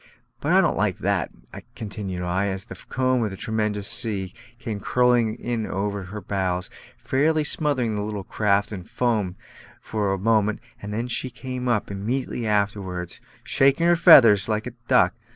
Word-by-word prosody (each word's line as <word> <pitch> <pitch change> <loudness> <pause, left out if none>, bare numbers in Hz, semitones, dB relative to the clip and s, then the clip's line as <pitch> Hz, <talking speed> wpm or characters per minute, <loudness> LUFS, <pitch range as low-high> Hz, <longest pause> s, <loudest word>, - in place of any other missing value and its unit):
But - - -1
I - - +6
don't - - +1
like - - 0
that" - - 0 0.5
continued 100 -4 -5
I, 95 +3 0
as 95 0 -4
the - - -9 0.2
comb 130 -1 +1
of 105 - -2
a - - -6
tremendous 105 -2 -2
sea 95 -5 0 0.2
came 115 -5 -5
curling 120 0 +2
in 120 -2 -3
over 100 -1 -3
our 105 0 -6
bows, 95 -2 -2 0.3
fairly 155 +3 +1
smothering 140 -7 0
the 105 - -2
little 105 -1 -4
craft 100 +1 0
in 95 -4 -6
foam 105 -5 -1 0.4
for 105 -3 -2
a 95 - 0
moment, 110 +1 +1 0.2
though 105 +4 -3
she 125 +1 -2
came 125 +1 -6
up 110 -4 0
immediately 115 +4 -3
afterwards, 100 -4 -2 0.2
"shaking 140 +5 +3
her 175 0 +5
feathers" 115 - +7
like 110 0 -1
a 125 - -5 0.2
duck. 125 - +4
105 Hz, 165 wpm, -24 LUFS, 100-125 Hz, 0.5 s, feathers